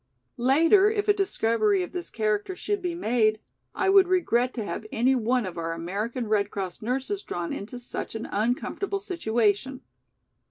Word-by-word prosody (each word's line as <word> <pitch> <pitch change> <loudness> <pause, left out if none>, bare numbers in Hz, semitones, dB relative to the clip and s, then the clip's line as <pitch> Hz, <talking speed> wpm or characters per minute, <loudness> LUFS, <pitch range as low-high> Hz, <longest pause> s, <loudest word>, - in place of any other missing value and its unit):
Later, 325 - +5
if 425 -1 -1
a 415 - +6
discovery 390 - +1
of - - -7
this 355 -1 -5
character 215 - -1
should 410 +2 -2
be 355 -2 -2
made, 220 -8 +2 0.4
I 385 - 0
would 390 -1 +6
regret 255 -10 +2
to 225 -4 -3
have 215 - -5
any 250 +4 +3
one 245 -1 +1
of 180 -2 -6
our 165 0 -2
American 205 +8 -3
Red 205 -1 +1
Cross 190 -4 -5
nurses 270 - -2
drawn 175 - -4
into 215 +5 -6
such 245 -2 -6
an 225 - -4
uncomfortable 250 - -1
situation." 240 - 0
245 Hz, 165 wpm, -26 LUFS, -, 0.4 s, a